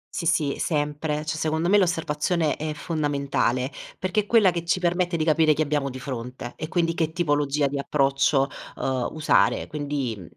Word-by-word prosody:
Sì, 170 - -2
sì, 145 -3 +1
sempre, 150 0 -1
cioè 155 0 -2
secondo 160 +2 0
me 205 +1 +6
l'osservazione 165 -2 0
è 155 0 -4
fondamentale, 140 -5 -1 0.3
perché 185 +3 0
è - - -11
quella 215 -5 +5
che 170 -1 -3
ci 175 +2 +1
permette 175 0 0
di 155 - 0
capire 155 -1 +4
chi 155 - +1
abbiamo 145 -2 -1
di 130 0 -7
fronte 125 -2 -6
e 155 - -5
quindi 165 -1 0
che 160 -2 -1
tipologia 145 -3 +1
di 140 0 -1
approccio, 140 0 +2 0.3
uhm, 130 -2 -1
usare. 155 -1 +2
Quindi, 145 -5 -3
mhmm, 95 - -11
150 Hz, 180 wpm, -25 LUFS, 140-165 Hz, 0.3 s, me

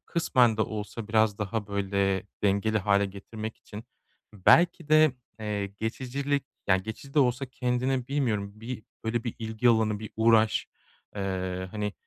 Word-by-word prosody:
kısmen 125 -9 +3
de 110 - +2
olsa 105 +1 -5
biraz 110 -2 +2
daha, 105 0 -2
böyle, 100 -1 0 0.2
dengeli 105 +2 +2
hâle 100 0 +2
getirmek 110 +3 -7
için 105 +2 -10 0.5
belki 165 - +4
de, 155 -2 +6 0.3
eee, 105 -2 -2
geçicilik, 130 +7 -2 0.2
ya, 95 - +5
geçici 110 +8 -7
de 150 - +3
olsa 130 0 +2
kendini 125 0 -1
bilmiyorum 115 -8 -1
bir 115 0 -6 0.2
böyle 115 +1 -1
bir 120 - -3
ilgi 110 +1 0
alanı, 110 -2 +3
bir 110 0 -8
uğraş, 110 -1 +4 0.5
eee, 95 -1 -3
hani, 105 0 -3
110 Hz, 145 wpm, -28 LUFS, 100-125 Hz, 0.5 s, de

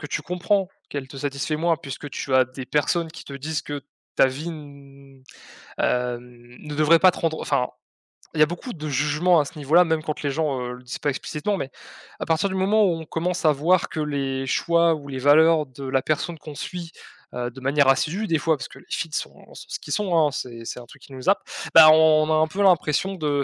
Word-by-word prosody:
que 145 - -6
tu - - -3
comprends 185 +2 0 0.2
qu'elle 140 -2 -5
te 135 0 -10
satisfait 145 +2 -2
moins 165 +1 +1
puisque 145 -2 -8
tu 135 -1 -3
as 130 - +6
des 130 +1 -8
personnes 160 +5 0
qui 165 0 -11
te 140 - -9
disent 150 +3 -3
que 145 -1 -6 0.3
ta - - +6
vie 140 +6 -5
n 140 -3 -12 0.6
heu, 125 -1 0
ne 125 +4 -12
devrait 155 +2 +5
pas 185 -1 +6
te - - -9
rendre 160 -1 -1
enfin, 130 -3 0 0.7
il 160 - -4
y 155 - +8
a - - +6
beaucoup 175 - -6
de 155 -2 -6
jugement 150 +5 +2
à 145 - +1
ce 150 - -10
niveau-là 160 +5 +4
même 160 -1 0
quand 155 -1 -5
les 140 - 0
gens, 150 -3 -1
heu, 125 0 -4
le 125 - -12
disent 125 - -6
pas 145 - 0
explicitement, 150 +8 -3
mais 135 - -4 0.5
à - - -3
partir 165 +4 +1
du 190 - -4
moment 205 +3 +3
où 170 -4 0
on 160 - -8
commence 175 +2 -2
à 155 - +6
voir 165 +6 +2
que 155 - -5
les 135 -3 -2
choix 170 +3 +2
ou 145 -2 -10
les 135 -1 -4
valeurs 155 +3 +5
de 130 +2 -11
la 130 0 +1
personne 155 +4 -2
qu'on 150 0 -10
suit, 175 0 -6 0.4
heu, 120 0 -3
de 130 - -11
manière 140 +1 +2
assidue, 170 +10 +1
des 165 -3 +2
fois, 160 0 +1
parce 125 - -7
que - - -14
les - - -19
feeds 160 -3 -3
sont - - -6
sont - - -11
ce - - -4
qu'ils 145 - -5
sont, 185 -3 0
hein, 150 -2 +3
c'est 115 -3 -6
c'est 125 - -6
un 120 - -11
truc 120 - -17
qui 140 - -14
nous 130 +7 -2
happe, 200 - +3 0.3
bah, 160 -1 +10
on 155 0 +5
a - - +4
un 155 0 +3
peu 190 +6 -4
l'impression 185 0 +2
de 145 -4 0
150 Hz, 245 wpm, -23 LUFS, 135-165 Hz, 0.7 s, bah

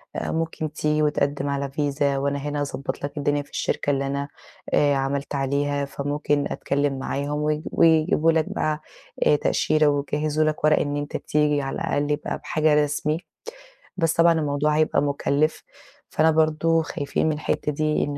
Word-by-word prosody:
آآ - - -2
ممكن 160 -2 -3
تيجي 150 -1 0
وتقدم 145 -1 0
على 140 -1 -2
فيزا، 140 -1 0
وأنا 140 +1 -1
هنا 145 +1 -3
هاضبط 140 -1 -4
لك 140 +2 -5
الدنيا 145 0 +1
في 145 - -15
الشركة - - -2
اللي 140 0 -1
أنا، 140 +1 -2 0.5
آآ 145 -1 +4
عملت 140 +1 -2
عليها، 140 +1 0
فممكن 145 +1 -1
أتكلم 140 -1 -1
معاهم 145 +2 -2
ويج 150 0 0
ويجيبوا 160 0 +4
لك 160 -1 +2
بقى، 155 0 -1 0.5
آآ - - +6
تأشيرة 155 +1 +2
ويجهزوا 150 +2 0
لك 155 0 -2
ورق 155 0 +4
إن 145 0 -1
أنت 145 0 -3
تيجي 150 -1 +1
على 135 -1 -4
الأقل 145 +1 -1
يبقى 150 0 -2
بحاجة 155 -2 +2
رسمي، 150 +2 -1 0.8
بس 165 -3 +2
طبعًا 170 0 +5
الموضوع 150 -1 0
هيبقى 155 -2 +2
مكلف، 145 +2 0 0.5
فأنا 160 +1 +3
برضه 160 +1 +2
خايفين 145 -3 -2
من 155 - +2
الحتة 150 0 -2
دي 155 +1 0
إن 145 -1 -3
145 Hz, 165 wpm, -24 LUFS, 140-155 Hz, 0.8 s, آآ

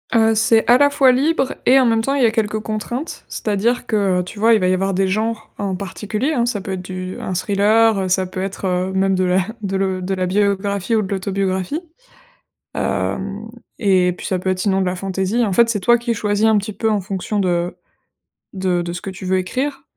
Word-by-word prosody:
Heu, 225 -1 +4
c'est 220 +1 +3
à 245 - +7
la 285 +1 +5
fois 275 -2 +4
libre 270 +2 +1
et, 265 +2 +6
en - - +3
même 225 -1 +2
temps, 270 +5 -1
il 275 - +2
y - - +6
a 225 - +3
quelques 215 -1 -1
contraintes, 225 +7 -5
c'est-à-dire 220 +4 -1
que, 200 -5 +1
heu, - - -1
tu 205 +3 -10
vois, 225 +1 +5
il 215 - +4
va 185 - +2
y - - +3
avoir 195 +1 0
des 190 +1 +1
genres 220 +2 -2
en 195 -2 -2
particulier, 210 - -3
hein, 240 -5 +1
ça 230 -4 -2
peut 190 - -6
être 185 - -4
du 185 0 -6
un 185 - -4
thriller, 210 +3 +3
heu, 190 - -1
ça 185 +1 +1
peut 185 0 -5
être, 195 0 -4
heu, 185 +1 -1
même 190 0 +2
de 185 0 +1
la 180 +1 +2 0.2
de 195 -2 -3
le 190 -1 -1
de 185 +1 -2
la 185 -1 -1
biographie 200 +2 0
ou 220 - +3
de 195 - -5
l'autobiographie. 190 - -2 0.9
Hem 200 +3 -2 0.3
et 185 -4 +3
puis - - -10
ça 185 - 0
peut 185 - -2
être 185 - -2
sinon 195 0 +1
de - - 0
la 180 0 -1
fantaisie. 195 +5 -1
En 205 -4 0
fait, 230 +4 +4
c'est 220 -3 0
toi 240 +6 +4
qui 235 0 -2
choisis 210 0 0
un 220 -1 +4
petit 205 +1 -3
peu 220 +3 -1
en 210 -2 +1
fonction 195 +2 -3
de 175 -2 0 0.8
de 185 -2 0
de 170 0 -4
ce 175 - -6
que 195 - -6
tu 190 0 -9
veux 185 0 +1
écrire. 270 +9 -3
200 Hz, 240 wpm, -19 LUFS, 185-225 Hz, 0.9 s, à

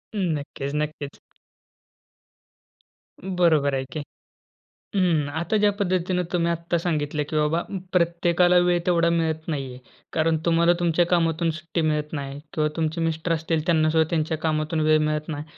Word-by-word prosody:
हं. - - -1 0.2
नक्कीच, 140 -1 -6
नक्कीच. 150 -1 -4 2.0
बरोबर 170 -6 +2
आहे 135 - -1
की. 155 - -4 1.0
हं, 170 -6 +2
आता 170 +6 0
ज्या 210 0 +3
पद्धतीने 180 -1 0
तुम्ही 170 -1 +1
आत्ता 170 +1 -1
सांगितलं 150 -3 -1
की - - -4
बाबा 150 +3 +1 0.3
प्रत्येकाला 175 0 +3
वेळ 175 0 +3
तेवढा 170 -2 +3
मिळत 160 -2 -1
नाहीये, 135 -5 -4 0.4
कारण 160 0 +2
तुम्हाला 170 0 +4
तुमच्या 175 0 +2
कामातून 165 -1 +1
सुट्टी 170 +1 -3
मिळत 150 0 -2
नाही 140 -1 -5
किंवा 155 -1 +1
तुमचे 160 0 -1
मिस्टर 165 +1 -1
असतील 160 -1 -1
त्यांना 155 -2 +3
सुद्धा 160 0 +2
त्यांच्या 160 -1 0
कामातून 155 0 -1
वेळ 155 0 +5
मिळत 150 0 -1
नाही. 150 -2 -4
165 Hz, 145 wpm, -24 LUFS, 155-170 Hz, 2.0 s, वेळ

